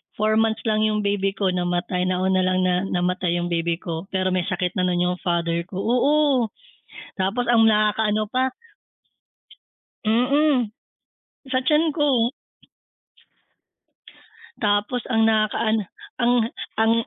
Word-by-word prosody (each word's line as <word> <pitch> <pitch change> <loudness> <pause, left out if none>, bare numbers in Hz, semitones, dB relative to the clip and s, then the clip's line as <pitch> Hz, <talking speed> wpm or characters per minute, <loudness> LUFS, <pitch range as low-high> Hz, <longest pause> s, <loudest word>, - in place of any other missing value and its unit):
4 215 +1 +1
months 225 0 0
lang 215 -1 +1
yung 210 -1 -1
baby 200 0 0
ko 195 -2 0
namatay, 180 0 -1
nauna 185 +1 +1
lang 185 0 +1
na 185 +1 +1
namatay 180 -1 -1
yung 175 0 -2
baby 170 0 0
ko 170 0 -6
pero 185 -1 0
may 185 -1 0
sakit 180 -2 -1
na 180 - 0
yung 180 0 0
father 170 -1 0
ko 185 - -6
oo 265 +3 +2 0.7
tapos 195 +6 0
ang 225 -2 +5
nakaka-ano 215 0 +2
pa 255 +1 +1 1.6
Mm. 250 +1 +2 0.8
Sa 255 - +2
tiyan 310 +1 +3
ko. 275 -6 +1 2.3
Tapos 210 +3 +1
ang 225 -3 +2
nakaka-ano 220 0 +1 0.4
ang 240 0 +3 0.4
ang 225 0 +3
210 Hz, 125 wpm, -22 LUFS, 180-230 Hz, 2.3 s, ang